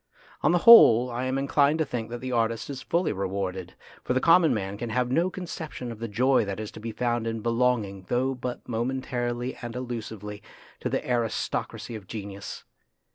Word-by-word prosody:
On 155 Hz, -, +3 dB
the 175 Hz, -, +4 dB
whole, 125 Hz, -, +9 dB
I 120 Hz, +2 st, -2 dB
am 130 Hz, +1 st, -1 dB
inclined 140 Hz, +2 st, +2 dB
to 160 Hz, -, +1 dB
think 120 Hz, -5 st, -4 dB
that 120 Hz, 0 st, -6 dB
the 130 Hz, 0 st, -4 dB
artist 115 Hz, +2 st, 0 dB
is 135 Hz, -2 st, -6 dB
fully 170 Hz, -5 st, 0 dB
rewarded, 95 Hz, -2 st, -4 dB, 0.3 s
for -, -, 0 dB
the 130 Hz, -, +2 dB
common 165 Hz, +2 st, +5 dB
man 100 Hz, -2 st, -2 dB
can 115 Hz, +3 st, -5 dB
have 125 Hz, +2 st, 0 dB
no 170 Hz, +7 st, +2 dB
conception 160 Hz, -9 st, -6 dB
of 115 Hz, -, -9 dB
the 115 Hz, -, -3 dB
joy 125 Hz, +5 st, +3 dB
that 100 Hz, 0 st, -4 dB
is 110 Hz, -1 st, -5 dB
to -, -, -10 dB
be 115 Hz, +1 st, -5 dB
found 120 Hz, 0 st, -1 dB
in 115 Hz, -1 st, -3 dB
belonging, 115 Hz, -5 st, 0 dB
though 130 Hz, +2 st, +1 dB
but 125 Hz, -1 st, -5 dB
momen 125 Hz, +3 st, -2 dB
tarily 120 Hz, 0 st, -3 dB
and 120 Hz, -1 st, -6 dB
illusively, 110 Hz, -4 st, -6 dB, 0.4 s
to -, -, -2 dB
the -, -, -2 dB
aristocracy 120 Hz, 0 st, -2 dB
of 105 Hz, -4 st, -8 dB
genius. 100 Hz, -2 st, -7 dB
120 Hz, 195 wpm, -26 LUFS, 110-130 Hz, 0.4 s, whole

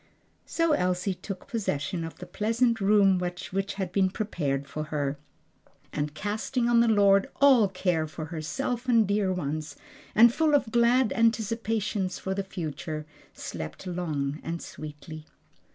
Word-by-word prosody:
So 330 Hz, -1 st, +1 dB
Elsie 185 Hz, -5 st, +1 dB
took 185 Hz, +1 st, -8 dB
possession 180 Hz, -, -2 dB
of 165 Hz, -, -7 dB
the 180 Hz, -, -8 dB
pleasant 230 Hz, +3 st, 0 dB
room 195 Hz, -2 st, +4 dB
which 180 Hz, 0 st, -4 dB, 0.3 s
had 190 Hz, -3 st, -3 dB
been 190 Hz, 0 st, +2 dB
prepared 145 Hz, -9 st, -2 dB
for 155 Hz, +2 st, -4 dB
her, 145 Hz, -2 st, -2 dB, 0.8 s
and 150 Hz, 0 st, -2 dB
casting 220 Hz, +5 st, -1 dB
on 240 Hz, -1 st, +4 dB
the 235 Hz, -, +4 dB
Lord 200 Hz, -2 st, +4 dB
all 265 Hz, -7 st, +6 dB
care 180 Hz, -4 st, 0 dB
for 155 Hz, +1 st, -6 dB
herself 245 Hz, -, -3 dB
and 230 Hz, -4 st, +5 dB
dear 200 Hz, -1 st, +1 dB
ones, 155 Hz, -3 st, -3 dB, 0.4 s
and 235 Hz, +2 st, +7 dB
full 310 Hz, 0 st, +3 dB
of 260 Hz, -6 st, +1 dB
glad 235 Hz, +1 st, +3 dB
anticipations 220 Hz, -4 st, 0 dB
for 190 Hz, -, -3 dB
the 195 Hz, +1 st, -2 dB
future, 155 Hz, -4 st, -5 dB, 0.3 s
slept 80 Hz, -, -7 dB
long 155 Hz, -5 st, -2 dB
and 170 Hz, +1 st, -4 dB
sweetly. 155 Hz, +1 st, -9 dB
190 Hz, 145 wpm, -27 LUFS, 155-225 Hz, 0.8 s, and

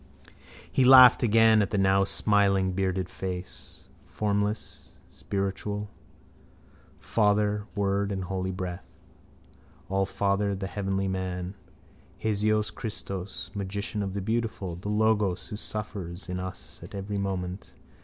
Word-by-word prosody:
He 135 Hz, -, +3 dB
laughed 130 Hz, -1 st, +9 dB
again 110 Hz, -2 st, +5 dB
at 100 Hz, -, 0 dB
the 105 Hz, -, -1 dB
now 95 Hz, 0 st, +4 dB
smiling 100 Hz, -2 st, +2 dB
bearded 95 Hz, 0 st, -1 dB
face. 90 Hz, -1 st, -7 dB, 0.2 s
Formless 105 Hz, 0 st, -2 dB, 0.2 s
spiritual. 100 Hz, +1 st, -3 dB, 1.1 s
Father, 105 Hz, -1 st, +1 dB
Word 100 Hz, 0 st, 0 dB
and 95 Hz, -1 st, -2 dB
Holy 95 Hz, 0 st, -3 dB
Breath. 90 Hz, -1 st, -4 dB, 1.1 s
Allfather, 100 Hz, +1 st, +1 dB
the 95 Hz, 0 st, -4 dB
heavenly 95 Hz, -1 st, -2 dB
man. 95 Hz, -1 st, -3 dB, 0.6 s
Hiesos 110 Hz, 0 st, +1 dB
Kristos, 100 Hz, -3 st, -6 dB
magician 100 Hz, +2 st, -3 dB
of 95 Hz, -1 st, -3 dB
the 100 Hz, -, -2 dB
beautiful, 110 Hz, -4 st, -2 dB
the 95 Hz, +4 st, -6 dB
Logos 105 Hz, -3 st, +1 dB
who 105 Hz, -, -5 dB
suffers 100 Hz, -4 st, -5 dB
in 90 Hz, 0 st, -3 dB
us 95 Hz, 0 st, -7 dB
at -, -, -10 dB
every 100 Hz, +1 st, -3 dB
moment. 95 Hz, -1 st, -4 dB
100 Hz, 115 wpm, -27 LUFS, 95-105 Hz, 1.1 s, laughed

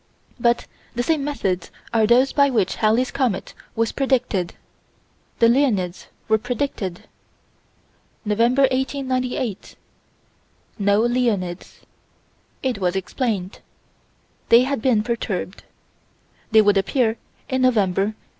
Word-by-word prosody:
By 235 Hz, 0 st, +4 dB, 0.4 s
the 240 Hz, -, 0 dB
same 305 Hz, +1 st, +1 dB
methods 195 Hz, -12 st, -2 dB, 0.2 s
as 220 Hz, -1 st, +3 dB
those 255 Hz, +3 st, +4 dB
by 280 Hz, -1 st, +4 dB
which 220 Hz, -7 st, 0 dB
Halley's 230 Hz, +4 st, +2 dB
comet 255 Hz, -8 st, -1 dB, 0.2 s
was 230 Hz, 0 st, 0 dB
predicted, 250 Hz, -10 st, 0 dB, 0.8 s
the 230 Hz, -, +5 dB
Leonids 230 Hz, -9 st, +1 dB, 0.2 s
were 220 Hz, 0 st, +3 dB
predicted. 245 Hz, -7 st, -4 dB, 1.2 s
November, 235 Hz, +6 st, +2 dB
1898 255 Hz, -4 st, -1 dB, 1.0 s
no 200 Hz, +1 st, +3 dB
Leonids. 225 Hz, -7 st, -1 dB, 0.8 s
It 255 Hz, -5 st, -1 dB
was 180 Hz, -1 st, 0 dB
explained. 195 Hz, 0 st, -3 dB, 0.9 s
They 235 Hz, +2 st, +7 dB
had 275 Hz, -2 st, -2 dB
been 225 Hz, -4 st, +2 dB
perturbed. 215 Hz, -5 st, -4 dB, 0.8 s
They 220 Hz, -1 st, +6 dB
would 205 Hz, -1 st, +3 dB
appear 225 Hz, +3 st, 0 dB, 0.3 s
in 260 Hz, 0 st, -1 dB
November, 205 Hz, -7 st, +2 dB
1899. 215 Hz, +1 st, -4 dB
230 Hz, 110 wpm, -22 LUFS, 200-255 Hz, 1.2 s, They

